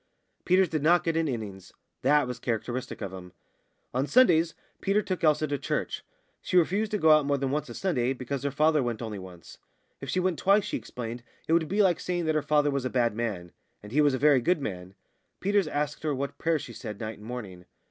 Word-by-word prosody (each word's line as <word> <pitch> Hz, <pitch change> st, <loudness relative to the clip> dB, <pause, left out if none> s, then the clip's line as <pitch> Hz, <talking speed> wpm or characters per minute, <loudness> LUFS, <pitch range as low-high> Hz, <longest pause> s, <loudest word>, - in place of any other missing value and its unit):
Peters 185 Hz, +1 st, +4 dB
did 155 Hz, -2 st, -2 dB
not 170 Hz, +4 st, +4 dB
get 165 Hz, -1 st, 0 dB
an 165 Hz, -1 st, +1 dB
innings 105 Hz, -7 st, -6 dB, 0.3 s
that 145 Hz, +2 st, +4 dB
was 125 Hz, -1 st, -5 dB
characteristic 120 Hz, +1 st, -3 dB
of 100 Hz, -3 st, -5 dB
him. 90 Hz, -1 st, -10 dB, 0.6 s
On 130 Hz, +3 st, 0 dB
Sundays 170 Hz, -9 st, +4 dB, 0.3 s
Peters 200 Hz, +1 st, +1 dB
took 185 Hz, -2 st, -3 dB
Elsa 155 Hz, -1 st, +3 dB
to 145 Hz, -2 st, -2 dB
church. -, -, -3 dB, 0.4 s
She 180 Hz, -, 0 dB
refused 195 Hz, +5 st, +2 dB
to 210 Hz, -, 0 dB
go 155 Hz, -4 st, +5 dB
more 140 Hz, 0 st, +1 dB
than 135 Hz, -1 st, -2 dB
once 150 Hz, +1 st, -2 dB
a -, -, -8 dB
Sunday, 135 Hz, -9 st, 0 dB
because 130 Hz, +1 st, -4 dB
her 140 Hz, -, -1 dB
father 155 Hz, +2 st, +3 dB
went 120 Hz, -2 st, -3 dB
only 110 Hz, -3 st, -5 dB
once; 90 Hz, -3 st, -12 dB, 0.4 s
if -, -, -7 dB
she 185 Hz, -, +1 dB
went 180 Hz, -2 st, 0 dB
twice, 200 Hz, +2 st, +4 dB
she -, -, -3 dB
explained, 120 Hz, 0 st, -6 dB, 0.3 s
it 160 Hz, -, +2 dB
would 165 Hz, -1 st, +3 dB
be 205 Hz, +5 st, +2 dB
like 180 Hz, -4 st, +3 dB
saying 175 Hz, -2 st, -2 dB
that 155 Hz, -, +1 dB
her 155 Hz, -, +1 dB
father 145 Hz, 0 st, +2 dB
was 140 Hz, -2 st, -1 dB
a 130 Hz, -, -1 dB
bad 120 Hz, -3 st, +1 dB
man; 100 Hz, -7 st, -3 dB, 0.3 s
and 105 Hz, -, -10 dB
he 150 Hz, +5 st, +3 dB
was 145 Hz, -3 st, +3 dB
a -, -, -1 dB
very 140 Hz, -2 st, +4 dB
good 175 Hz, +6 st, +2 dB
man. 95 Hz, -7 st, -6 dB, 0.4 s
Peters 200 Hz, -2 st, +2 dB
asked 145 Hz, -1 st, -2 dB
her 150 Hz, -2 st, -1 dB
what 140 Hz, +1 st, -4 dB
prayers 165 Hz, -3 st, 0 dB
she 120 Hz, -, -9 dB
said 105 Hz, -1 st, -7 dB
night 110 Hz, -2 st, -5 dB
and 105 Hz, -, -11 dB
morning. 100 Hz, -8 st, -7 dB
145 Hz, 230 wpm, -28 LUFS, 120-165 Hz, 0.6 s, go